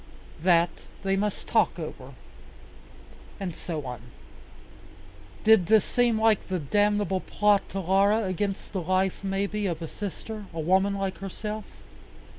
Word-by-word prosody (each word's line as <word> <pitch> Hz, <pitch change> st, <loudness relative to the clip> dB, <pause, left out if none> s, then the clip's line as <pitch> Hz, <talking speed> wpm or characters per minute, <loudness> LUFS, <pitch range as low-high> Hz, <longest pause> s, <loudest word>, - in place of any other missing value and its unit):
That 170 Hz, 0 st, +4 dB, 0.3 s
they 195 Hz, 0 st, +1 dB
must 205 Hz, +1 st, -2 dB
talk -, -, +2 dB
over. -, -, -7 dB, 1.2 s
And 185 Hz, -5 st, -4 dB
so 160 Hz, -5 st, -5 dB
on. 125 Hz, -3 st, -6 dB, 1.4 s
Did 220 Hz, -5 st, +6 dB
this 220 Hz, 0 st, +5 dB
seem 240 Hz, -3 st, +2 dB
like 220 Hz, -2 st, +4 dB
a 185 Hz, -, 0 dB
damnable 205 Hz, +4 st, +1 dB
plot 205 Hz, +1 st, +2 dB
to 195 Hz, -, -3 dB
Laura 200 Hz, +4 st, +3 dB
against 195 Hz, +2 st, -3 dB
the 190 Hz, -, -1 dB
life, 185 Hz, +2 st, +1 dB
maybe, 200 Hz, +1 st, -1 dB
of 170 Hz, -3 st, -2 dB
a 165 Hz, -, -5 dB
sister, 210 Hz, +3 st, -6 dB
a -, -, -3 dB
woman 190 Hz, +5 st, +2 dB
like 195 Hz, -1 st, -3 dB
herself? 210 Hz, +2 st, -5 dB
195 Hz, 135 wpm, -27 LUFS, 185-210 Hz, 1.4 s, Did